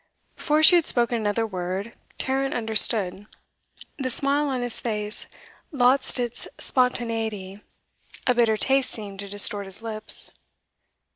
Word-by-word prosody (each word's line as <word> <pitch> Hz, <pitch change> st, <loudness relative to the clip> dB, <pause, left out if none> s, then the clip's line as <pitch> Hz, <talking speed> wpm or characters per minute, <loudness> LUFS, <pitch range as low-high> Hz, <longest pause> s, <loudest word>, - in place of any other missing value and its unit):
Before 305 Hz, 0 st, 0 dB
she 350 Hz, +2 st, +8 dB
had 335 Hz, -, 0 dB
spoken 240 Hz, -1 st, +1 dB
another 220 Hz, 0 st, -1 dB
word, 190 Hz, +2 st, -5 dB, 0.2 s
Tarrant 270 Hz, +1 st, -2 dB
understood; 215 Hz, -3 st, +2 dB, 0.7 s
the 260 Hz, -1 st, -2 dB
smile 280 Hz, +3 st, +1 dB
on 255 Hz, -2 st, -2 dB
his 245 Hz, -2 st, 0 dB
face 210 Hz, -2 st, -3 dB, 0.4 s
lost 260 Hz, -1 st, +2 dB
its 240 Hz, -1 st, -2 dB
spontaneity; 225 Hz, -6 st, -1 dB, 0.6 s
a 250 Hz, -, +3 dB
bitter 230 Hz, -3 st, +2 dB
taste 270 Hz, +3 st, +1 dB
seemed 200 Hz, -4 st, -8 dB
to 200 Hz, 0 st, -7 dB
distort 205 Hz, 0 st, +2 dB
his 195 Hz, +4 st, -1 dB
lips. 215 Hz, -1 st, -1 dB
230 Hz, 130 wpm, -24 LUFS, 205-255 Hz, 0.7 s, she